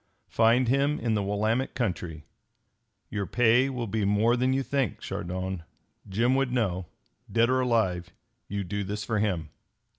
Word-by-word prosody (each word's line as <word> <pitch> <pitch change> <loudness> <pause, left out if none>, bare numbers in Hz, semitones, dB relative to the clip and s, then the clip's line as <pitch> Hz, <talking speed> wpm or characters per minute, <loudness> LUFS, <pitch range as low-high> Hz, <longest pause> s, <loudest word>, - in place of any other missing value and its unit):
Find 115 +2 +4
him 140 +4 +2
in 115 -2 0
the 105 - +1
Willamette 110 +6 0
country. 90 - -3 0.9
Your 100 -2 -2
pay 125 +2 +4
will 125 -3 -3
be 110 0 -1
more 105 +4 +3
than 130 +1 +1
you 135 +1 +1
think, 135 -6 -1
Chardon. 95 +1 -4 0.5
Jim 115 +6 +2
would 135 -1 +1
know. 95 -8 0 0.4
Dead 115 +2 +3
or 130 - +3
alive, 100 -8 +1 0.4
you 100 0 -3
do 100 +3 -3
this 105 +2 -4
for 105 0 -1
him. 90 -7 -1
110 Hz, 155 wpm, -27 LUFS, 95-125 Hz, 0.9 s, Find